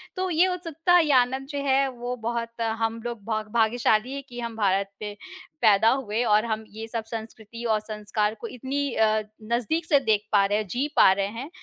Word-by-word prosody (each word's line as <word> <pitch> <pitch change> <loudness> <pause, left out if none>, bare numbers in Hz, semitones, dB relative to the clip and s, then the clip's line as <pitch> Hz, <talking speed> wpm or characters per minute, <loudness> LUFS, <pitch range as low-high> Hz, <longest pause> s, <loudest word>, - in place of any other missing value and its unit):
तो 370 -1 -1
ये 350 +2 +4
उत्सुकता 355 -1 +1
ये 315 -3 +2
आनंद 260 +1 +2
जो 285 0 -4
है, 270 0 +3
वो 245 0 -5
बहुत 230 0 -3
हम 225 0 -1
लोग 235 -3 -5
भाग 215 -1 -2
भाग्यशाली 230 +1 +2
हैं 280 0 -5
कि 245 0 -8
हम 235 -1 -5
भारत 195 -2 +1
पे 210 -1 -5 0.5
पैदा 220 -1 +5
हुए 240 -3 0
और 215 -1 +3
हम 220 -1 -2
ये 220 +2 -8
सब 225 0 -4
संस्कृति 225 0 -8
और 220 -2 +2
संस्कार 210 0 -2
को 235 - -4
इतनी 270 +3 -3
अ, 220 0 +2 0.3
नज़दीक 250 +8 0
से 295 -4 +4
देख 215 -5 +1
पा 200 -2 +5
रहे 205 +1 +1
हैं, 215 -1 -3
जी 255 +10 -1
पा - - +7
रहे 195 +1 0
हैं। 230 +8 -7
230 Hz, 205 wpm, -25 LUFS, 215-265 Hz, 0.5 s, पा